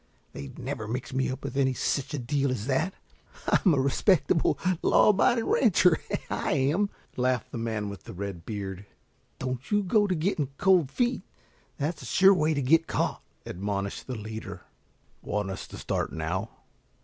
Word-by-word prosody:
They'd 70 Hz, -1 st, -8 dB
never 110 Hz, -, -4 dB
mix 125 Hz, +3 st, -4 dB
me 130 Hz, 0 st, 0 dB
up 130 Hz, +2 st, -5 dB
with -, -, -5 dB
any 130 Hz, -2 st, +2 dB
such 135 Hz, +3 st, 0 dB, 0.2 s
deal 140 Hz, +2 st, +1 dB
as 120 Hz, -5 st, -2 dB
that. 150 Hz, +8 st, 0 dB, 0.5 s
I'm 180 Hz, -7 st, +4 dB
a -, -, +1 dB
respectable 145 Hz, +3 st, +2 dB, 0.2 s
law -, -, +5 dB
abiding 225 Hz, +3 st, +3 dB
rancher, 180 Hz, -8 st, +4 dB, 0.3 s
I -, -, -1 dB
am," 150 Hz, +9 st, +2 dB, 0.3 s
laughed 125 Hz, -1 st, 0 dB
the 120 Hz, -, -4 dB
man 110 Hz, -2 st, -2 dB
with 100 Hz, -3 st, -8 dB
the -, -, -8 dB
red 95 Hz, -3 st, -5 dB
beard. 100 Hz, -1 st, -6 dB, 0.5 s
"Don't 130 Hz, 0 st, -4 dB
you 205 Hz, -1 st, +2 dB
go 205 Hz, +2 st, +3 dB
to 185 Hz, -, 0 dB
getting 155 Hz, -4 st, 0 dB
cold 180 Hz, -7 st, +4 dB
feet. 245 Hz, -, 0 dB, 0.6 s
That's 150 Hz, +2 st, -2 dB
the -, -, -8 dB
sure 195 Hz, +1 st, +6 dB
way 155 Hz, -3 st, +2 dB
to 140 Hz, -, 0 dB
get 165 Hz, +5 st, +4 dB
caught," -, -, -1 dB, 0.2 s
admonished 100 Hz, +1 st, -4 dB
the 130 Hz, -, -4 dB
leader. 110 Hz, 0 st, -7 dB, 0.6 s
"Want 105 Hz, -2 st, -2 dB
us 95 Hz, -, -6 dB
to -, -, -10 dB
start -, -, -2 dB
now?" 85 Hz, +7 st, -3 dB
130 Hz, 170 wpm, -27 LUFS, 105-170 Hz, 0.6 s, sure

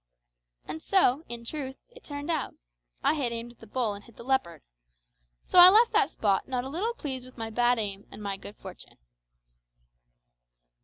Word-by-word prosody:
And 315 Hz, -, -6 dB
so, 315 Hz, -7 st, +3 dB
in 235 Hz, 0 st, -7 dB
truth, 265 Hz, 0 st, -4 dB, 0.2 s
it 485 Hz, 0 st, -16 dB
turned 290 Hz, +2 st, -5 dB
out. 315 Hz, -4 st, -2 dB, 0.5 s
I -, -, +4 dB
had 275 Hz, -6 st, -1 dB
aimed 235 Hz, +1 st, -5 dB
at 240 Hz, -, -23 dB
the -, -, -14 dB
bull 225 Hz, -1 st, -1 dB
and 200 Hz, 0 st, -10 dB
hit 235 Hz, -, -18 dB
the -, -, -10 dB
leopard. 260 Hz, -, -1 dB, 0.8 s
So 360 Hz, -, +5 dB
I 355 Hz, +1 st, +12 dB
left 450 Hz, +5 st, +5 dB
that 440 Hz, -1 st, +3 dB
spot 200 Hz, -3 st, 0 dB
not 250 Hz, -2 st, -2 dB
a 265 Hz, -, -6 dB
little 415 Hz, +11 st, -2 dB
pleased 265 Hz, -, -5 dB
with 255 Hz, -, -16 dB
my 225 Hz, -1 st, -5 dB
bad 245 Hz, +2 st, +3 dB
aim 200 Hz, -2 st, -3 dB
and 210 Hz, -, -10 dB
my 200 Hz, -1 st, -2 dB
good 200 Hz, +1 st, -11 dB
fortune. 190 Hz, -1 st, -12 dB
250 Hz, 190 wpm, -28 LUFS, 225-310 Hz, 0.8 s, I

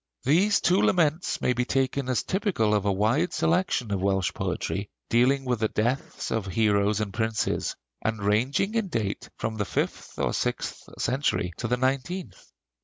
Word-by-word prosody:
These 190 Hz, +10 st, +3 dB
two 180 Hz, +2 st, +3 dB
laments 165 Hz, -1 st, +2 dB
may 125 Hz, -, +2 dB
be 125 Hz, +1 st, 0 dB
taken 135 Hz, +1 st, 0 dB
as 120 Hz, -6 st, +1 dB
typical 185 Hz, -, +1 dB
of 105 Hz, -1 st, +1 dB
a 100 Hz, -, +3 dB
wide 110 Hz, -, +1 dB
section 165 Hz, -, +1 dB
of 100 Hz, -2 st, 0 dB
Welsh 95 Hz, -1 st, +1 dB
poetry, 100 Hz, +1 st, -3 dB, 0.2 s
dealing 130 Hz, +4 st, +3 dB
with 125 Hz, -3 st, 0 dB
the 110 Hz, -, +2 dB
deaths 120 Hz, +6 st, -2 dB
of 110 Hz, -3 st, -1 dB
heroes 105 Hz, +1 st, +2 dB
and 105 Hz, -2 st, -3 dB
princes, 110 Hz, 0 st, -1 dB, 0.3 s
and 110 Hz, 0 st, 0 dB
ranging 125 Hz, -, +1 dB
in 225 Hz, -3 st, 0 dB
date 110 Hz, -, -3 dB
from 110 Hz, 0 st, -3 dB
the 105 Hz, -, 0 dB
fifth -, -, -3 dB
or -, -, 0 dB
sixth -, -, -2 dB
century 125 Hz, -, 0 dB
to 120 Hz, -, -2 dB
the 125 Hz, +2 st, +1 dB
nineteenth. 135 Hz, -, -2 dB
120 Hz, 170 wpm, -26 LUFS, 105-140 Hz, 0.3 s, These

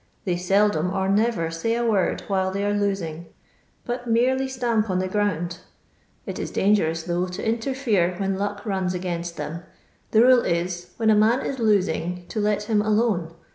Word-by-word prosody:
They 180 Hz, -3 st, 0 dB
seldom 180 Hz, -1 st, +2 dB
or 190 Hz, 0 st, -1 dB
never 200 Hz, -5 st, +1 dB
lay 230 Hz, 0 st, +1 dB
a 240 Hz, 0 st, 0 dB
word 210 Hz, -5 st, +1 dB
while 190 Hz, -1 st, 0 dB
they 195 Hz, +1 st, -2 dB
are 205 Hz, -, +1 dB
lotbg, 195 Hz, -6 st, -2 dB, 0.6 s
but 245 Hz, 0 st, -4 dB
merely 255 Hz, +3 st, +2 dB
stamp 235 Hz, -4 st, 0 dB
on 185 Hz, -, +1 dB
the 185 Hz, 0 st, 0 dB
ground; 180 Hz, -4 st, -1 dB, 0.7 s
it -, -, -5 dB
is -, -, -3 dB
dangerous, 165 Hz, -5 st, +1 dB
though, 175 Hz, +1 st, -1 dB
to 180 Hz, +4 st, -5 dB
interfere 225 Hz, -6 st, 0 dB
when 195 Hz, 0 st, -1 dB
lock 205 Hz, +1 st, -3 dB
rons 190 Hz, -4 st, -1 dB
against 175 Hz, -1 st, -4 dB
them. 165 Hz, +3 st, -5 dB, 0.5 s
The 220 Hz, +1 st, +5 dB
rule 255 Hz, -1 st, +6 dB
is, 175 Hz, +1 st, -2 dB
when 220 Hz, -1 st, +3 dB
a -, -, +5 dB
man 220 Hz, +5 st, +3 dB
is 265 Hz, -, -3 dB
losing 180 Hz, -5 st, 0 dB
to 220 Hz, -, -3 dB
let 210 Hz, 0 st, +1 dB
him 210 Hz, -1 st, +1 dB
alone. 210 Hz, -6 st, 0 dB
200 Hz, 175 wpm, -24 LUFS, 180-225 Hz, 0.7 s, rule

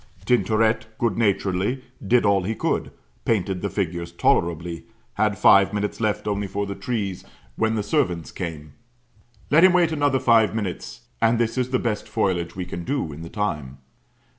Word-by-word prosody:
Tintoret 110 Hz, -1 st, +2 dB
good 115 Hz, -5 st, 0 dB
naturedly 100 Hz, +3 st, 0 dB, 0.2 s
did 120 Hz, +1 st, +4 dB
all 100 Hz, -1 st, +3 dB
he 105 Hz, +5 st, -2 dB
could -, -, -1 dB, 0.3 s
painted 95 Hz, -4 st, 0 dB
the -, -, -2 dB
figures 85 Hz, -3 st, -3 dB
tolerably 85 Hz, 0 st, 0 dB, 0.3 s
had 105 Hz, -1 st, +1 dB
five 100 Hz, +1 st, +5 dB
minutes 105 Hz, +2 st, -2 dB
left 105 Hz, -1 st, -1 dB
only 100 Hz, -1 st, -1 dB
for 100 Hz, +1 st, -3 dB
the 100 Hz, -, -4 dB
trees, 100 Hz, -2 st, -3 dB, 0.3 s
when 110 Hz, 0 st, +1 dB
the 105 Hz, -, -1 dB
servant 90 Hz, -, -1 dB
came. 75 Hz, -4 st, -6 dB, 0.8 s
"Let 160 Hz, +4 st, +6 dB
him 185 Hz, -1 st, +7 dB
wait 175 Hz, -2 st, +3 dB
another 145 Hz, -3 st, +1 dB
five 110 Hz, -5 st, +4 dB
minutes." 95 Hz, -, -4 dB, 0.2 s
And 115 Hz, +1 st, +4 dB
this 115 Hz, -1 st, 0 dB
is 130 Hz, -1 st, -1 dB
the 130 Hz, -, +1 dB
best 115 Hz, -4 st, -3 dB
foliage 85 Hz, -3 st, -1 dB
we 90 Hz, -1 st, -4 dB
can 85 Hz, -, -6 dB
do 135 Hz, -, -2 dB
in 75 Hz, -, -9 dB
the 85 Hz, -, -8 dB
time. 75 Hz, -11 st, -3 dB
105 Hz, 170 wpm, -23 LUFS, 90-115 Hz, 0.8 s, him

